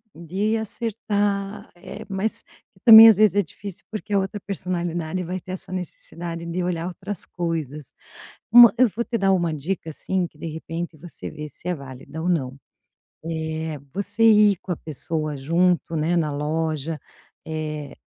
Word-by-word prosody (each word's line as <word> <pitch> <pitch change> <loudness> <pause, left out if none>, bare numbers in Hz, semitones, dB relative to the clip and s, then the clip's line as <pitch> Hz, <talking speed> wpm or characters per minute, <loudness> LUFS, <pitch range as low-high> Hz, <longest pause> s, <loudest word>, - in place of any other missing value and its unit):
de 195 +7 -1
acertar, 205 -2 -2
eh, 195 +4 -10
mas 195 +3 -1
que - - -27
também 225 -2 +12
as 220 - +7
vezes 210 -2 +4
é 205 - +3
difícil 195 +3 -10
porque 215 -1 -6
a 200 - +3
outra 195 +2 -3
personalidade 180 -2 -3
vai 180 +2 -4
ter 185 - -10
essa 185 0 -6
necessidade 170 -2 -5
de 170 +2 -3
olhar 175 -1 -2
outras 185 +1 -3
coisas. 155 -5 -4 0.6
Uma 240 0 +9
eu 255 -1 +6
vou 230 +3 -3
te 235 - -2
dar 195 -2 +3
uma 170 -3 +1
dica 160 +3 -4
assim, 185 +3 -1
que - - -13
de - - -6
repente 165 +1 -5
você 165 +2 -9
vê 150 -1 -8
se 170 - -11
é 180 - 0
válida 140 +3 -9
ou 180 - 0
não. 135 -6 -1 0.7
Eh. 160 -1 -3 0.2
Você 200 +3 -2
ir 210 -3 +6
com - - -10
a - - -3
pessoa 155 0 -4
junto 170 +4 +1
né 165 +3 +1
na 155 -3 0
loja, 155 +1 -2 0.5
eh, 155 -2 -5
175 Hz, 170 wpm, -23 LUFS, 160-200 Hz, 0.7 s, também